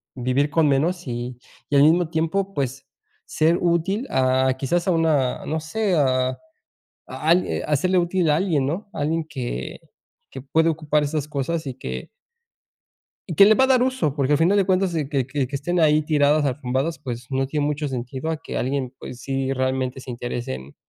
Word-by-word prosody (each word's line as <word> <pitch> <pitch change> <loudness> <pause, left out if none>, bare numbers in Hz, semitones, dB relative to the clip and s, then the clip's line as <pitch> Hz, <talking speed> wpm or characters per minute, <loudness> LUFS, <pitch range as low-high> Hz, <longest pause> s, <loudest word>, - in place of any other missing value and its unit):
vivir 130 +3 0
con 160 -1 +3
menos 160 +5 0
y 120 0 -4 0.3
y 145 - 0
al 140 - +7
mismo 165 +2 +4
tiempo, 180 +5 -1
pues, 135 -1 -3 0.4
ser 160 +2 +2
útil, 180 +8 0
ah, 130 0 +2
quizás 170 +7 0
a - - +4
una, 155 -6 +1
no 160 - -2
sé, 195 +4 -1
a 130 -3 +1 0.7
algui 170 +4 +1
a 150 - +1
serle 185 +5 +1
útil 175 -1 +1
a 150 - +3
alguien, 165 -7 +1
¿no?, 190 +8 -4
alguien 160 +1 -1
que 120 - -5 0.5
que 135 - -8
puede 160 +5 +2
ocupar 150 -1 0
esas 150 0 -2
cosas 150 +3 -2
y 130 - -5
que 65 - -6 1.2
Y 170 - -3
que 200 - +8
le 215 +2 +6
va 260 - +4
a - - +4
dar 260 -2 +4
uso 255 - 0
porque, 140 -1 +1
al 145 - +4
final 175 +5 +3
de 200 - +3
cuentas, 185 -1 +1
que 150 -4 -1 0.2
que 140 0 -1
que 140 +3 -4
estén 175 +6 -2
ahí 155 -1 +4
tiradas, 150 0 +2
arrumbadas, 135 +3 -1
pues, 120 -1 -6
no 135 0 0
tiene 145 +1 -1
mucho 150 0 -2
sentido 130 +4 -4
a 160 - -1
que - - -7
alguien, 130 0 -2
pues, 125 - -9
sí 135 0 -2
realmente 130 0 -1
se 130 - -9
interese 120 - -4
en 65 +2 -10
150 Hz, 195 wpm, -23 LUFS, 130-165 Hz, 1.2 s, que